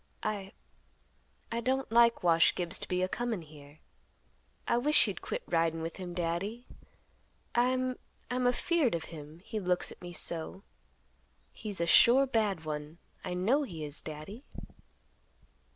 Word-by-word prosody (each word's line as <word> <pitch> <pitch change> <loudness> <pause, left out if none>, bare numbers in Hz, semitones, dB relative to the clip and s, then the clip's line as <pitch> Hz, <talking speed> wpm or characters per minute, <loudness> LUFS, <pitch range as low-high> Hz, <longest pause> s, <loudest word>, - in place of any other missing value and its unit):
I—I 210 +2 -8
don't 260 0 0
like 235 -2 +5
Wash 165 -1 +5
Gibbs 175 -1 0
to - - -6
be 180 0 0
a - - +2
comin' 225 -3 -2
here. 150 -1 -15 0.9
I 235 - +3
wish 295 -1 +6
you'd 195 -4 -4
quit - - -4
ridin' 165 -1 +1
with 165 - -5
him, 180 -2 -6
Daddy. 185 +8 -2 0.9
I'm—I'm 255 0 -1
afeared 270 - +2
of 165 - -3
him; 155 +1 -10
he 220 - -3
looks 180 -2 0
at - - -13
me 175 0 -7
so. 170 +3 -2 0.9
He's 205 -4 -5
a 170 - +1
sure 245 +10 +7
bad 210 -10 0
one—I 155 +4 -6
know 225 +11 +2
he 170 - -5
is, 145 0 -5
Daddy." 155 - -8
185 Hz, 135 wpm, -31 LUFS, 165-235 Hz, 0.9 s, sure